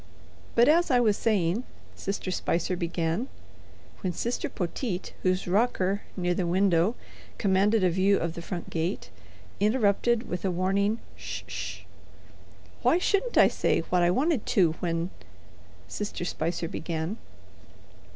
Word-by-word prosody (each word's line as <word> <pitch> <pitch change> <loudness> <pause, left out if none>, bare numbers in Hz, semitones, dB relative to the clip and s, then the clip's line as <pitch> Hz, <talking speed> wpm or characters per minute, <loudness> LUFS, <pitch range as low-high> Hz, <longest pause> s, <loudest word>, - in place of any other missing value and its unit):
"But 235 +1 +6
as 335 +3 +4
I 250 -3 +4
was 215 -4 +3
saying—" 205 0 +1 0.3
Sister 195 -1 -3
Spicer 175 0 0
began, 170 +5 -1 0.7
when 185 -3 -1
Sister 235 +8 -2
Poteet, 180 +2 -3
whose 185 0 0
rocker, 200 -1 +1 0.2
near 180 -1 +1
the 175 0 -1
window, 185 +3 +3 0.4
commanded 200 +1 +3
a 180 - +5
view 190 +3 +3
of 170 -1 -2
the 170 - -7
front 175 0 -6
gate, 160 - -2 0.5
interrupted 220 +2 +2
with 180 - -4
a 195 - +1
warning, 195 +4 +1 0.2
"'Sh - - -6
'sh." - - -5 1.0
"Why - - +4
shouldn't 400 +6 +1
I - - +8
say - - +1
what 180 - +4
I 175 - +4
wanted 265 - +1
to 190 -9 +4
when—" 170 +1 -1 0.8
Sister 205 -4 -4
Spicer 165 0 -2
began. 165 +4 -3
190 Hz, 135 wpm, -27 LUFS, 175-220 Hz, 1.0 s, I